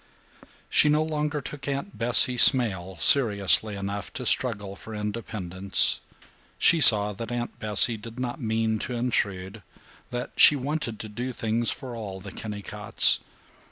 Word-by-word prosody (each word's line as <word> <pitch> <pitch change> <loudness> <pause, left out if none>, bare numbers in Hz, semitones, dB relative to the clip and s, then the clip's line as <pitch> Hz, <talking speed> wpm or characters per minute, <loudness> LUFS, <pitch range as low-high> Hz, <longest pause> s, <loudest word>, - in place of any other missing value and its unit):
She 150 - +2
no 150 +1 +1
longer 150 -1 -4
took 145 +2 -9
Aunt 140 +8 -5
Bessie 125 +2 +3
Smail 95 -8 +3
seriously 105 -5 +3
enough 100 -1 -6
to - - -7
struggle 105 -6 -1
for 110 +2 -11
independence. 105 -3 +1 0.6
She 165 - +3
saw 105 -5 +6
that 115 +4 -8
Aunt 120 0 -6
Bessie 110 +2 +2
did 115 +3 -12
not 125 -1 -6
mean 110 -1 -2
to 125 - -6
intrude; 105 -4 -3 0.5
that 125 0 -6
she 150 - +5
wanted 135 -4 -5
to 110 - -8
do 120 +5 -6
things 115 0 -3
for 130 -3 -6
all 100 -4 -8
the 100 +1 -11
Kennicotts. 105 -1 +2
115 Hz, 145 wpm, -24 LUFS, 105-125 Hz, 0.6 s, saw